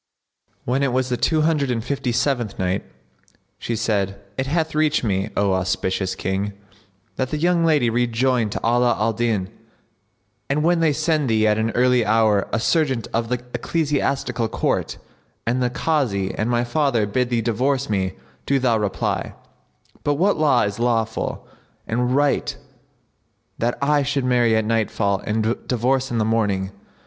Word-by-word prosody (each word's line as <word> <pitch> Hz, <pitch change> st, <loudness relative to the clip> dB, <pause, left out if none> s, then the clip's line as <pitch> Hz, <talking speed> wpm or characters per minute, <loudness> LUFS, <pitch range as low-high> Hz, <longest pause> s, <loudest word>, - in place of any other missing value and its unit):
When 130 Hz, +3 st, 0 dB
it 140 Hz, -2 st, +1 dB
was 130 Hz, 0 st, 0 dB
the 125 Hz, -, +1 dB
Two 155 Hz, +5 st, +1 dB
Hundred 155 Hz, -4 st, +1 dB
and 115 Hz, -3 st, -1 dB
Fifty 130 Hz, -1 st, -2 dB
seventh 120 Hz, -3 st, 0 dB
Night, 95 Hz, +1 st, -1 dB, 0.8 s
She 115 Hz, -, -3 dB
said, 100 Hz, -3 st, -1 dB, 0.2 s
It 135 Hz, -, -2 dB
hath 160 Hz, +2 st, 0 dB
reached 155 Hz, -2 st, +2 dB
me, 95 Hz, -3 st, 0 dB
O 100 Hz, -1 st, +2 dB
auspicious 95 Hz, 0 st, -1 dB
King, 95 Hz, +2 st, -2 dB, 0.6 s
that 130 Hz, -1 st, -1 dB
the 150 Hz, -, -2 dB
young 170 Hz, +2 st, +2 dB
lady 150 Hz, -7 st, +3 dB
rejoined 120 Hz, 0 st, +1 dB
to -, -, -2 dB
Ala 120 Hz, +1 st, +3 dB
al 110 Hz, +1 st, +1 dB
Din, 110 Hz, -4 st, -1 dB, 1.0 s
"And 145 Hz, +2 st, +1 dB
when 170 Hz, +1 st, +3 dB
they 165 Hz, -2 st, +3 dB
send 155 Hz, -2 st, 0 dB
thee 110 Hz, -1 st, +3 dB
at 105 Hz, 0 st, +2 dB
an 110 Hz, +1 st, +1 dB
early 125 Hz, 0 st, +3 dB
hour 110 Hz, -2 st, +2 dB
a 110 Hz, -, 0 dB
serjeant 135 Hz, -3 st, +1 dB
of 115 Hz, 0 st, -1 dB
the 125 Hz, -1 st, -2 dB
Ecclesiastical 140 Hz, -3 st, -1 dB
Court, -, -, -1 dB, 0.5 s
and 125 Hz, +3 st, 0 dB
the 125 Hz, -, +2 dB
Kazi 125 Hz, -9 st, 0 dB
and 110 Hz, -, -2 dB
my 120 Hz, 0 st, +1 dB
father 120 Hz, -3 st, +1 dB
bid 125 Hz, +4 st, 0 dB
thee 120 Hz, -2 st, +1 dB
divorce 130 Hz, +4 st, 0 dB
me, 95 Hz, -3 st, -1 dB, 0.3 s
do 140 Hz, -, +3 dB
thou 125 Hz, -4 st, +2 dB
reply, 105 Hz, -2 st, -2 dB, 0.7 s
By 145 Hz, -, +2 dB
what 185 Hz, +8 st, +2 dB
law 155 Hz, -2 st, +3 dB
is 100 Hz, +1 st, -3 dB
it -, -, -3 dB
lawful 115 Hz, -2 st, -1 dB, 0.4 s
and 125 Hz, +2 st, 0 dB
right 145 Hz, 0 st, +1 dB, 1.0 s
that 120 Hz, +1 st, 0 dB
I 145 Hz, +1 st, +3 dB
should 140 Hz, -1 st, -1 dB
marry 120 Hz, -3 st, +3 dB
at 110 Hz, -1 st, +1 dB
nightfall 105 Hz, -3 st, 0 dB
and 110 Hz, +2 st, +1 dB
divorce 130 Hz, +2 st, +1 dB
in 120 Hz, -, -2 dB
the 110 Hz, -, +1 dB
morning? 100 Hz, -4 st, 0 dB
120 Hz, 165 wpm, -22 LUFS, 110-140 Hz, 1.0 s, lady